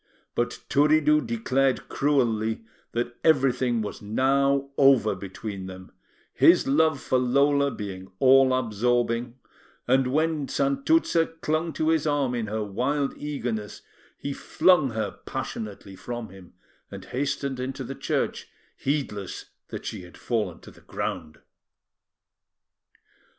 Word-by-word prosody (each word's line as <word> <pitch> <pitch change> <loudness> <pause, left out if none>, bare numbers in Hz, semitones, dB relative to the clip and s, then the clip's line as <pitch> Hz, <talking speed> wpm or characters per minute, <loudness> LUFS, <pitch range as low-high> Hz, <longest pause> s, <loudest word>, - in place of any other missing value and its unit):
But - - -2
Turiddu 150 +1 +4
declared 135 - 0
cruelly 115 -6 0 0.3
that 120 0 -2
everything 130 -6 +2
was 105 - -6
now 140 +5 +1
over 135 -7 +5
between 95 0 -7
them, 95 0 -10 0.4
his - - +5
love 150 +1 +3
for 130 - +1
Lola 140 +3 +3
being 95 -6 -7
all 135 +1 +6
absorbing, 120 0 0 0.5
and 130 +1 +3
when 155 +1 0
Santuzza 275 - +2
clung 155 +2 0
to 155 - 0
his 160 -1 +2
arm 145 -4 +1
in 115 -3 -2
her 110 +1 -2
wild 135 +8 -1
eagerness, 120 -8 -4 0.3
he 140 - -4
flung 170 -1 +3
her 110 -1 -4
passionately 100 -2 -6
from 120 +2 -6
him, 95 -1 -14 0.4
and - - -9
hastened 135 0 -2
into 130 +1 -4
the 130 +2 -6
church, - - -2 0.3
heedless 135 -9 -3 0.2
that - - -7
she 105 - -5
had 90 -1 -13
fallen 105 -8 -2
to - - -13
the - - -19
ground. 75 -1 -5
130 Hz, 125 wpm, -26 LUFS, 110-145 Hz, 0.5 s, all